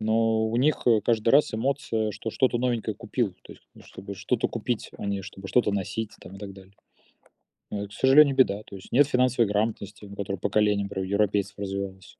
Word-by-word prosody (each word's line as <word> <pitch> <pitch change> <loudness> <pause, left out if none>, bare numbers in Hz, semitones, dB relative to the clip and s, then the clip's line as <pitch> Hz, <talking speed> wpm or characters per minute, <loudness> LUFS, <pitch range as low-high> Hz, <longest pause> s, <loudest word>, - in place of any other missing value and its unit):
Но 110 0 +2
у 115 +2 -2
них, 140 +3 +2
э, 115 -3 +5
каждый 110 +1 +1
раз 145 0 +4
эмоция, 115 -3 -1
что 110 +2 -5
что-то 125 0 +1
новенькое 120 -3 -1
купил. 105 -5 -2
То - - -12
есть, - - -20
ну, - - -15
чтобы 100 +1 -9
что-то 115 +5 -1
купить, 115 0 -3
а - - -5
не 100 -1 -2
чтобы 95 0 -9
что-то 120 -3 +2
носить 100 +2 -3
там 95 - -11
и - - -12
так 100 -1 -7
далее. 95 0 -15 1.0
Ну 100 - -3
это 100 - -6
к 105 - -17
сожалению, 135 +4 +5
беда. 105 -6 +3
То 100 - -10
есть, 95 - -13
нет 140 +3 +5
финансовой 125 -3 +2
грамотности, 105 -1 -2
которая 100 -1 -4
поколениями, 105 +1 +1
например, 95 -1 -4
у - - -8
европейцев 100 -1 0
развивалась. 95 -1 -5
105 Hz, 205 wpm, -26 LUFS, 100-120 Hz, 1.0 s, э